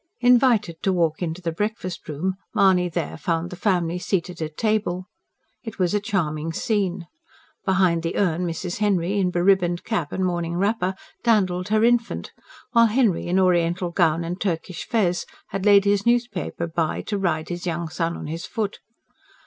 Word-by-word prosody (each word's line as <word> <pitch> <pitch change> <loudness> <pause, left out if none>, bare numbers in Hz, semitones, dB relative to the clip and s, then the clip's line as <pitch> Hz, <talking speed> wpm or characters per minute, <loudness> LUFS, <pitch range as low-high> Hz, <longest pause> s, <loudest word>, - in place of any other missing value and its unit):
Invited 235 -9 +4
to 195 - +1
walk 165 -3 +1
into 175 +1 -3
the 165 - -1
breakfast 185 -1 -4
room, 165 +6 -1 0.2
Mahony 185 -3 +4
there 160 - -3
found 165 +2 -2
the - - -5
family 180 -3 0
seated 180 -2 -2
at 155 -1 -5
table. 210 -5 0 0.6
It 225 -3 -8
was 180 -1 +1
a 205 - +3
charming 165 -6 -2
scene. 190 -3 -1 0.6
Behind 185 -3 +3
the 165 +1 -3
urn 180 -2 +1
Mrs. 175 +2 -4
Henry, 200 -2 +1
in 185 -2 +2
be 175 -1 -1
ribboned 175 -2 +2
cap 190 -10 -2
and 190 - -1
morning 170 -1 -1
wrapper, 190 -1 0 0.3
dandled 185 -6 +2
her 215 +1 +2
infant; 235 0 +1 0.4
while 230 -1 +6
Henry, 220 -7 +1
in 180 +2 +1
oriental 175 -1 +2
gown 170 -2 +2
and 175 +3 -5
Turkish 180 -2 -3
fez, 190 -7 +1 0.2
had 195 +1 -2
laid 200 -1 +6
his 200 0 +2
newspaper 240 -7 0
by 165 -1 -1
to 205 -2 -2
ride 160 -4 -1
his 175 +1 -4
young 170 0 -2
son 165 +1 -2
on - - -7
his 165 +3 -5
foot. 215 -3 -3
180 Hz, 175 wpm, -23 LUFS, 170-205 Hz, 0.6 s, while